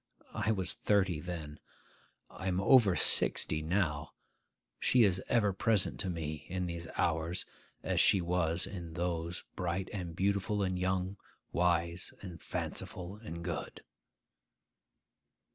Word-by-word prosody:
I 105 +1 -1
was 95 -4 +1
thirty 95 -6 +1
then; 80 -3 -6 0.7
I 95 - -7
am 90 0 +1
over 100 -2 +6
sixty 80 -2 +2
now: 80 -3 -1 0.7
she 125 -2 +5
is 95 -3 +3
ever 105 -5 +3
present 105 +1 +2
to 95 - -1
me 75 -3 -4
in 90 0 -2
these 85 -1 -5
hours 85 +2 0 0.4
as - - 0
she 100 - +6
was 85 -1 +1
in 85 -4 -7
those, 85 0 -2
bright 90 +1 -2
and 90 -5 -4
beautiful 100 +2 +1
and 95 -1 -1
young, 95 +1 -1 0.3
wise 85 0 0
and 90 -4 -8
fanciful 90 +3 -4
and 85 -6 -7
good. 85 -3 -5
90 Hz, 125 wpm, -33 LUFS, 85-95 Hz, 0.7 s, over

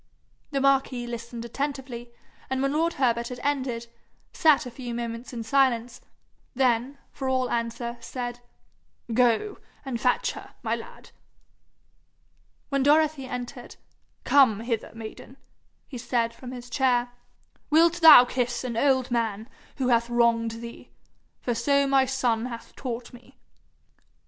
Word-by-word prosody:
The 280 - -1
marquis 270 -2 +2
listened 235 0 -6
attentively, 255 -2 -5 0.4
and 265 0 -1
when 275 +1 0
lord 330 +2 +1
Herbert 235 -3 +1
had 250 0 -7
ended, 260 -5 -1 0.5
sat 305 -5 +4
a 250 - -7
few 240 -1 -6
moments 235 0 -5
in 235 -2 -5
silence; 245 -1 +1 0.5
then, 255 +1 +1
for 265 -1 -4
all 255 -1 0
answer, 235 +1 -3
said, 245 0 -5 0.7
'Go 250 - +2 0.3
and 245 -4 -4
fetch 250 - +2
her, - - -11
my - - 0
lad.' - - -12 1.6
When 275 -1 +1
Dorothy 295 -1 +3
entered, 245 0 -7 0.5
'Come 250 -7 +4
hither, 230 -2 -3
maiden,' 225 +3 -10 0.5
he 255 - -8
said 235 -1 0
from 250 +1 -10
his 245 -1 -8
chair. 245 -2 +1 0.6
'Wilt 335 +3 +4
thou 315 -6 +10
kiss 245 -1 -2
an 245 -2 -4
old 260 0 +2
man 225 -2 -1 0.3
who 260 -2 -1
hath 235 0 +2
wronged 230 -1 +1
thee 235 0 -10 0.5
for 245 - -1
so 280 +5 +2
my 270 -1 +3
son 245 -3 0
hath 235 -2 -9
taught 245 -2 -6
me?' 245 0 -16
245 Hz, 135 wpm, -26 LUFS, 235-270 Hz, 1.6 s, thou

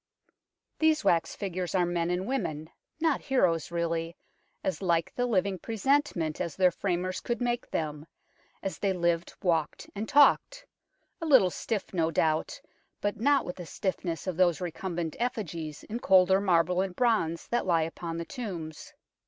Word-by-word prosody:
These 315 -1 +3
wax 165 -1 +2
figures 185 -2 -3
are 180 -2 +3
men 175 -1 -1
and 180 +1 -1
women, 160 - -3 0.3
not 320 -3 +1
heroes 185 - +1
really, 170 0 -2 0.5
as 185 -5 -2
like 170 -3 +1
the 245 0 0
living 195 -4 +1
presentment 225 - 0
as 170 -4 -3
their 185 -1 +4
framers 185 0 -2
could 240 - -3
make 240 -1 -1
them, 150 -1 -3 0.6
as 195 - -4
they 195 -2 +1
lived, 170 -1 0
walked 165 -4 0
and 210 +2 -4
talked; - - +4 0.6
a 330 - -2
little 245 -12 +6
stiff 210 0 -3
no 165 -3 +1
doubt, 155 -1 0 0.4
but 205 0 -2
not 280 +4 +3
with 180 - -6
the 175 - -7
stiffness 180 -3 -3
of 185 -3 -3
those 175 -3 +3
recumbent 175 -2 -4
effigies 170 -11 -3
in 230 +3 -5
colder 190 -2 +5
marble 180 -1 +3
and 190 -2 -3
bronze 215 -9 +1
that 240 -4 0
lie 165 -3 +3
upon 165 +1 -5
the 170 - -4
tombs. 175 - -7
180 Hz, 160 wpm, -29 LUFS, 165-220 Hz, 0.6 s, little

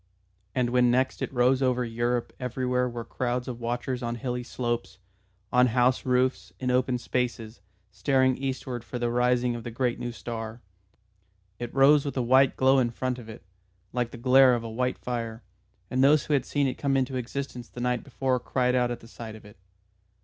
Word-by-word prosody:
And 125 -2 +1
when 125 -1 +4
next 130 +2 +1
it - - -2
rose 130 +1 +3
over 125 -1 +1
Europe 120 +1 -1
everywhere 125 0 -1
were 120 -1 -6
crowds 125 0 -2
of 120 -2 -5
watchers 120 +2 -3
on 120 -1 -2
hilly 125 +1 -3
slopes, 120 -5 -3 0.6
on 125 0 +6
house 125 +2 +2
roofs, 125 +1 +1
in 125 -1 0
open 125 0 +2
spaces, 120 -3 -3 0.3
staring 130 +7 +2
eastward 130 -2 -4
for 125 - -6
the 120 -1 -1
rising 125 0 +2
of 115 - -6
the 120 - -5
great 120 +1 -1
new 120 0 -3
star. 115 0 -6 1.0
It 120 -1 -5
rose 140 +2 +5
with 140 -1 -4
a - - +2
white 130 +2 +4
glow 130 +1 +5
in 120 -2 +2
front 125 +1 -3
of 115 -2 -11
it, 110 -1 -10 0.5
like 120 -1 0
the 120 - -10
glare 130 +1 +6
of 115 - -3
a 115 - -5
white 125 +3 -1
fire, 115 -2 -4 0.5
and 130 +1 +2
those 145 +2 +5
who 150 - -1
had 135 -3 +1
seen 145 -1 +1
it 130 - -2
come 140 -1 +1
into 130 0 -1
existence 125 0 -5
the - - -10
night 125 0 0
before 130 -1 -1
cried 125 +1 0
out 125 -1 +2
at 120 - -5
the 115 - -13
sight 115 -2 -9
of 110 - -14
it. 105 -1 -15
125 Hz, 200 wpm, -27 LUFS, 120-130 Hz, 1.0 s, on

